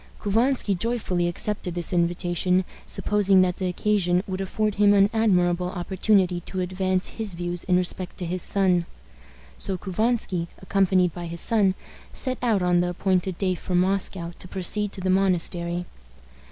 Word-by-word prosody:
Couvansky 225 +1 +1
joyfully 185 -3 -1
accepted 180 0 -2
this 175 0 -2
invitation, 175 +1 +1 0.2
supposing 200 -2 +3
that 180 -1 -1
the 185 - -2
occasion 180 -1 +1
would 190 0 -4
afford 210 +2 -1
him 205 0 +6
an 200 +1 +4
admirable 180 -5 +2
opportunity 185 0 +1
to 185 +2 -6
advance 185 0 0
his 215 -5 -4
views 175 0 -4
in 180 -2 +3
respect 180 0 -2
to 180 - -3
his 180 +2 -2
son. 180 -3 +2 0.7
So 190 - 0
Couvansky, 190 -2 -1
accompanied 190 -2 +1
by 175 -1 -6
his 170 0 -3
son, 200 -5 +3 0.4
set 255 -2 -2
out 220 -6 +1
on 175 -1 +3
the 175 0 +1
appointed 185 0 -1
day 185 -2 0
from 180 +1 0
Moscow 190 -2 -1
to - - -8
proceed 195 +3 -1
to 190 - -7
the 185 0 +1
monastery. 175 -2 0
185 Hz, 155 wpm, -24 LUFS, 175-200 Hz, 0.7 s, him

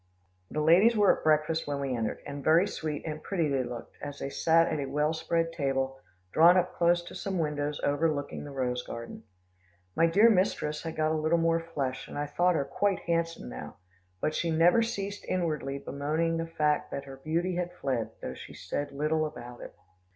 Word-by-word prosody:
The 150 - -2
ladies 185 +9 +6
were 205 -2 +5
at - - -12
breakfast 155 +1 +2
when 145 -1 -2
we 135 -2 -1
entered, 115 -2 -3
and 140 0 -6
very 165 +7 +5
sweet 155 -6 -4
and 155 -1 -4
pretty 170 -6 0
they 135 -2 +1
looked, 120 -1 -7
as 145 -1 -6
they 140 - -5
sat 165 +3 +4
at 155 - -1
a 140 - -2
well 150 +3 +1
spread 165 +1 -1
table, 135 -3 -1 0.3
drawn 170 +3 +7
up 180 0 +1
close 175 0 +3
to - - -10
some 195 -2 -3
windows 150 -2 -1
overlooking 145 0 0
the 145 - -8
rose 125 -3 -2
garden. 115 -1 -8 0.7
My 165 - +4
dear 200 +7 +6
mistress 180 -6 +1
had 165 -1 -5
got 155 0 +1
a 155 -1 0
little 160 +2 +2
more 165 0 +2
flesh, 140 -6 -4
and - - -8
I 145 - -1
thought 175 +5 +2
her 140 - 0
quite 195 +8 0
handsome 165 - -1
now, - - -8 0.4
but 155 - 0
she 170 - -1
never 165 +7 +5
ceased 200 -3 -3
inwardly 155 -6 -1
bemoaning 155 +4 -1
the 165 0 -2
fact 150 -2 0
that 140 - -5
her 135 -1 -10
beauty 170 +6 -1
had 175 0 -2
fled, 130 -9 -2
though 65 - -4
she - - -11
said 145 - -4
little 155 +2 0
about 120 -4 -10
it. - - -10
155 Hz, 200 wpm, -29 LUFS, 140-170 Hz, 0.7 s, drawn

